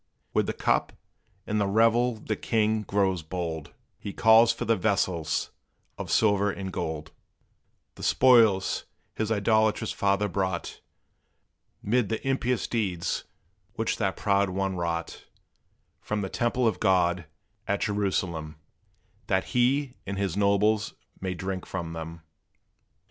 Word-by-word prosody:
With - - +2
the - - -1
cup - - 0 0.5
and 105 0 0
the 100 - +1
revel 115 +4 +3
the 110 0 -3
king 110 -1 +1
grows 95 -3 0
bold 80 -2 -5 0.3
He 100 - -6
calls 115 +1 +6
for 115 - -4
the 115 - +3
vessels 90 -5 0 0.4
of - - -6
silver 100 -2 +3
and 95 -1 -5
gold; 80 0 -4 0.8
The - - -13
spoils 115 -7 +4 0.3
his 110 0 -2
idolatrous 110 0 +2
father 100 +1 +1
brought, 95 -2 -3 1.0
'Mid 115 0 +1
the 115 +4 -3
impious 125 -4 0
deeds 95 -8 -2 0.5
which 115 0 -1
that 95 -4 -1
proud 100 -1 +2
one 95 +1 -1
wrought, 85 -1 -3 0.8
From 105 0 -2
the 95 - -3
temple 120 +2 +1
of 110 - 0
God, 90 -4 +2 0.4
at 100 -1 0
Jerusalem, 95 -7 -1 0.7
That 95 -1 +2
he 130 +2 +2
and 100 0 -3
his 100 -3 -1
nobles 105 +1 +2 0.2
may 95 -1 -3
drink 95 +1 -4
from 85 -3 -4
them. 80 0 -7
100 Hz, 130 wpm, -27 LUFS, 95-110 Hz, 1.0 s, calls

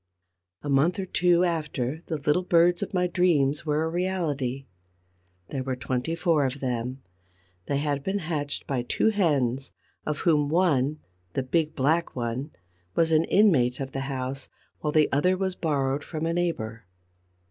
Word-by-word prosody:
A - - -5
month 140 +5 +3
or 195 - -2
two 180 -1 +3
after 155 -4 -1
the 160 - -2
little 150 +5 +1
birds 175 -1 +3
of 200 - -3
my 180 -1 +1
dreams 165 -5 +2
were 150 +1 +1
a - - 0
reality. 160 -7 -2 0.8
There 135 - -3
were 130 0 -2
twenty 125 +5 -2
four 165 -4 +2
of 135 +2 -5
them. 125 0 -3 0.6
They 140 - 0
had 145 -1 -1
been 190 +4 -1
hatched 155 -5 -3
by 135 -3 -1
two 125 - +1
hens, 140 - +1 0.3
of 150 -1 -3
whom 150 -4 +3
one, 155 -4 +2 0.3
the 135 - -1
big 155 +3 0
black 160 +6 +1
one, 125 +4 -3 0.5
was 165 -1 +3
an 160 +1 +4
inmate 145 - +3
of 135 -1 -4
the 135 - -3
house, 130 0 -4 0.3
while 150 - -1
the 155 -1 +4
other 180 +6 +2
was 190 0 -1
borrowed 145 -4 -1
from 160 -1 -4
a 165 - 0
neighbor. 115 -11 -2
150 Hz, 165 wpm, -26 LUFS, 135-170 Hz, 0.8 s, an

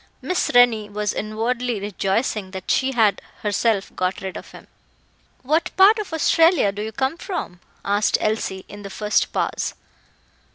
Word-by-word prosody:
Miss 365 0 -1
Rennie 230 -4 +5
was 210 0 -2
inwardly 230 +2 -2
rejoicing 200 +1 -1
that 190 -1 -4
she 270 0 +1
had 220 -4 +3 0.2
herself 210 -1 0
got 185 +1 -1
rid 190 -1 -5
of - - -8
him. - - -13 0.8
"What 310 +6 +1
part 405 +4 +7
of 420 - -5
Australia 325 - +3
do 200 +1 -6
you 220 +1 -4
come 265 +6 -1
from?" 340 - -5 0.3
asked 205 +1 +2
Elsie, 215 -3 -2
in 205 +1 -10
the 200 - -8
first 210 +2 0
pause. - - -2
215 Hz, 155 wpm, -22 LUFS, 200-265 Hz, 0.8 s, part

